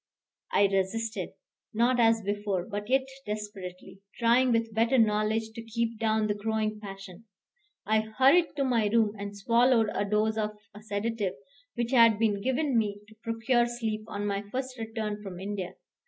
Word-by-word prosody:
I 200 Hz, -, +4 dB
resisted, 200 Hz, +4 st, -1 dB, 0.4 s
not 245 Hz, +2 st, +3 dB
as 225 Hz, -1 st, +4 dB
before, 200 Hz, -2 st, -2 dB
but 205 Hz, +1 st, -5 dB
yet 265 Hz, 0 st, +3 dB, 0.2 s
desperately, 195 Hz, -3 st, -7 dB, 0.2 s
trying 245 Hz, +2 st, +4 dB
with 230 Hz, -1 st, 0 dB
better 230 Hz, +4 st, +2 dB
knowledge 220 Hz, 0 st, +2 dB
to 230 Hz, +1 st, -8 dB
keep 230 Hz, 0 st, -3 dB
down 220 Hz, -1 st, +1 dB
the 210 Hz, -, +1 dB
growing 215 Hz, 0 st, -2 dB
passion. 195 Hz, 0 st, -10 dB, 0.6 s
I 220 Hz, +1 st, +3 dB
hurried 265 Hz, +11 st, +3 dB
to 280 Hz, -, 0 dB
my 235 Hz, -5 st, +2 dB
room 215 Hz, -1 st, +2 dB
and 200 Hz, 0 st, -6 dB
swallowed 230 Hz, +1 st, +3 dB
a -, -, 0 dB
dose 215 Hz, +2 st, +1 dB
of 210 Hz, -1 st, -2 dB, 0.2 s
a 210 Hz, -, -12 dB
sedative 210 Hz, -2 st, -2 dB, 0.4 s
which 240 Hz, 0 st, -2 dB
had 230 Hz, -4 st, +6 dB
been 210 Hz, -2 st, +1 dB
given 260 Hz, +3 st, 0 dB
me 205 Hz, -2 st, -2 dB
to 220 Hz, -, -17 dB
procure 235 Hz, +1 st, +1 dB
sleep 225 Hz, -3 st, -3 dB
on 205 Hz, -2 st, -4 dB
my 200 Hz, -1 st, -1 dB
first 260 Hz, +1 st, -3 dB
return 220 Hz, -2 st, -4 dB
from 190 Hz, -3 st, -8 dB
India. 195 Hz, -1 st, -5 dB
220 Hz, 165 wpm, -28 LUFS, 205-230 Hz, 0.6 s, had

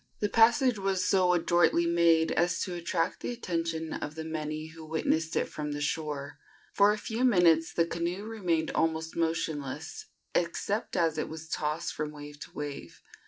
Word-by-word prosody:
The 210 Hz, -, 0 dB
passage 230 Hz, +2 st, +4 dB
was 190 Hz, -1 st, 0 dB
so 185 Hz, -3 st, +4 dB
adroitly 175 Hz, 0 st, +3 dB
made 170 Hz, -1 st, +4 dB
as 175 Hz, +1 st, +1 dB
to 185 Hz, -, -4 dB
attract 170 Hz, -1 st, -1 dB
the -, -, -4 dB
attention 165 Hz, -7 st, -3 dB
of 150 Hz, -, -5 dB
the 160 Hz, -, -5 dB
many 155 Hz, 0 st, -4 dB
who 160 Hz, 0 st, -11 dB
witnessed 160 Hz, 0 st, 0 dB
it -, -, +2 dB
from 150 Hz, -1 st, -5 dB
the 145 Hz, -, -4 dB
shore. 145 Hz, -1 st, -3 dB, 0.3 s
For 200 Hz, +1 st, +5 dB
a 210 Hz, -, -1 dB
few 225 Hz, +3 st, -3 dB
minutes 175 Hz, -9 st, +4 dB
the 170 Hz, -, +2 dB
canoe 170 Hz, +3 st, -3 dB
remained 180 Hz, -8 st, -1 dB
almost 160 Hz, 0 st, -1 dB
motionless, 160 Hz, -4 st, -3 dB, 0.3 s
except 195 Hz, +5 st, -1 dB
as 165 Hz, -2 st, +2 dB
it -, -, -2 dB
was 160 Hz, 0 st, -8 dB
tossed 155 Hz, +3 st, -2 dB
from 155 Hz, 0 st, -3 dB
wave 145 Hz, 0 st, -10 dB
to -, -, -9 dB
wave. 145 Hz, -, -7 dB
165 Hz, 170 wpm, -29 LUFS, 155-180 Hz, 0.3 s, For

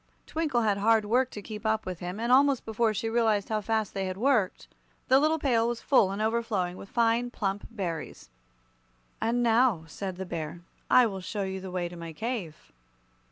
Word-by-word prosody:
Twinkle 295 Hz, -7 st, 0 dB
had 205 Hz, -2 st, +1 dB
hard 220 Hz, +1 st, +3 dB
work 250 Hz, +4 st, +2 dB
to 205 Hz, -, -8 dB
keep 210 Hz, 0 st, -7 dB
up 220 Hz, 0 st, 0 dB
with 185 Hz, -2 st, -5 dB
him, 180 Hz, +3 st, -5 dB
and 235 Hz, +2 st, -1 dB
almost 275 Hz, 0 st, +4 dB
before 220 Hz, 0 st, +1 dB
she 215 Hz, +2 st, -2 dB
realized 225 Hz, -3 st, +1 dB
how 215 Hz, -1 st, 0 dB
fast 220 Hz, 0 st, -1 dB
they 195 Hz, -1 st, -2 dB
had 185 Hz, 0 st, -4 dB
worked, 225 Hz, -5 st, +1 dB, 0.4 s
the 260 Hz, +1 st, +6 dB
little 310 Hz, +2 st, +2 dB
pail 240 Hz, -6 st, +2 dB
was 240 Hz, -1 st, -2 dB
full 235 Hz, -8 st, +4 dB
and 195 Hz, +1 st, -4 dB
overflowing 220 Hz, -6 st, -1 dB
with 195 Hz, -, -11 dB
fine, 235 Hz, +1 st, +2 dB
plump 205 Hz, -4 st, -3 dB
berries. 175 Hz, -, -5 dB, 0.9 s
"And 240 Hz, +2 st, +1 dB
now," 230 Hz, -6 st, +3 dB
said 185 Hz, +4 st, -6 dB
the 190 Hz, +1 st, -5 dB
Bear, 165 Hz, -1 st, -5 dB, 0.3 s
"I 255 Hz, -, +7 dB
will 195 Hz, -4 st, -3 dB
show 200 Hz, +2 st, -3 dB
you 190 Hz, 0 st, -4 dB
the 190 Hz, -, -7 dB
way 180 Hz, -1 st, -2 dB
to 175 Hz, -, -10 dB
my 165 Hz, -1 st, -7 dB
cave." 210 Hz, -5 st, -5 dB
220 Hz, 200 wpm, -28 LUFS, 190-235 Hz, 0.9 s, I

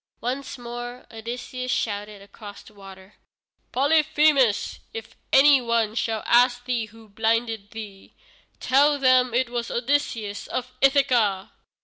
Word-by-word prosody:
Once 260 Hz, +4 st, -4 dB
more 240 Hz, +1 st, -8 dB
Odysseus 245 Hz, +3 st, -6 dB
shouted 205 Hz, -1 st, -3 dB
across 205 Hz, 0 st, -12 dB
the 215 Hz, -, -17 dB
water: 195 Hz, 0 st, -14 dB, 0.5 s
"Polyphemus, 290 Hz, -4 st, +2 dB, 0.2 s
if 455 Hz, -, -8 dB, 0.2 s
any 275 Hz, 0 st, +6 dB
one 230 Hz, -2 st, 0 dB
shall 225 Hz, -1 st, -2 dB
ask 245 Hz, 0 st, +3 dB
thee 245 Hz, -3 st, -1 dB
who 225 Hz, +1 st, -17 dB
blinded 225 Hz, 0 st, -1 dB
thee, 210 Hz, -3 st, -11 dB, 0.4 s
tell 285 Hz, +3 st, +3 dB
them 255 Hz, -2 st, +3 dB
it 250 Hz, -1 st, 0 dB
was 240 Hz, -1 st, -3 dB
Odysseus 235 Hz, -5 st, -2 dB
of 255 Hz, 0 st, -4 dB
Ithaca." 245 Hz, -8 st, +2 dB
240 Hz, 120 wpm, -24 LUFS, 215-255 Hz, 0.5 s, any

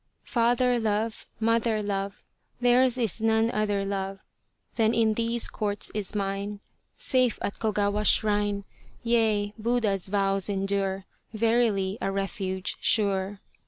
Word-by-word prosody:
Father 245 Hz, +1 st, +2 dB
love, 220 Hz, 0 st, -1 dB
mother 225 Hz, -1 st, +1 dB
love, 200 Hz, 0 st, -3 dB, 0.4 s
Theirs 250 Hz, +1 st, +4 dB
is 230 Hz, -3 st, +1 dB
none 225 Hz, +1 st, +2 dB
other 205 Hz, -2 st, 0 dB
love 195 Hz, -1 st, -4 dB, 0.5 s
Than 225 Hz, 0 st, +2 dB
in 220 Hz, -1 st, +3 dB
these 230 Hz, +1 st, 0 dB
Courts 205 Hz, -1 st, -2 dB
is 210 Hz, -1 st, -1 dB
mine. 200 Hz, 0 st, -3 dB, 0.4 s
Safe 255 Hz, -3 st, +2 dB
at 200 Hz, -, -3 dB
Kogawa's 210 Hz, -1 st, 0 dB
shrine, 205 Hz, -1 st, +2 dB, 0.4 s
Yea, 220 Hz, -3 st, +1 dB
Buddha's 215 Hz, -5 st, 0 dB
Vows 195 Hz, 0 st, +1 dB
endure, 195 Hz, -1 st, -1 dB, 0.3 s
Verily 220 Hz, -3 st, +1 dB
a 195 Hz, -, -1 dB
refuge 190 Hz, -1 st, -3 dB
sure. 200 Hz, -3 st, +1 dB
210 Hz, 120 wpm, -27 LUFS, 195-230 Hz, 0.5 s, Theirs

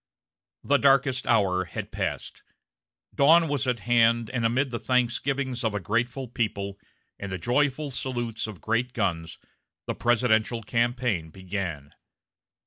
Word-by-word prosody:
The 145 Hz, -, +3 dB
darkest 135 Hz, -2 st, +3 dB
hour 95 Hz, -6 st, +2 dB
had -, -, -6 dB
passed; -, -, -4 dB, 0.7 s
dawn 165 Hz, +4 st, +5 dB
was 145 Hz, -2 st, -1 dB
at 120 Hz, -4 st, 0 dB
hand, 115 Hz, 0 st, +3 dB
and 125 Hz, -3 st, -2 dB
amid 125 Hz, +4 st, +1 dB
the 115 Hz, -, -3 dB
thanksgivings 125 Hz, +1 st, 0 dB
of 110 Hz, -2 st, 0 dB
a -, -, 0 dB
grateful 120 Hz, +6 st, -1 dB
people, 100 Hz, -4 st, -3 dB, 0.4 s
and 100 Hz, -1 st, -6 dB
the 95 Hz, -, -2 dB
joyful 140 Hz, -, 0 dB
salutes 120 Hz, -4 st, -3 dB
of 105 Hz, -5 st, -9 dB
great 120 Hz, +3 st, -1 dB
guns, 85 Hz, -7 st, -2 dB, 0.5 s
the -, -, -2 dB
presidential 120 Hz, -1 st, +1 dB
campaign 115 Hz, -6 st, 0 dB
began. 90 Hz, -5 st, -5 dB
120 Hz, 135 wpm, -26 LUFS, 105-130 Hz, 0.7 s, dawn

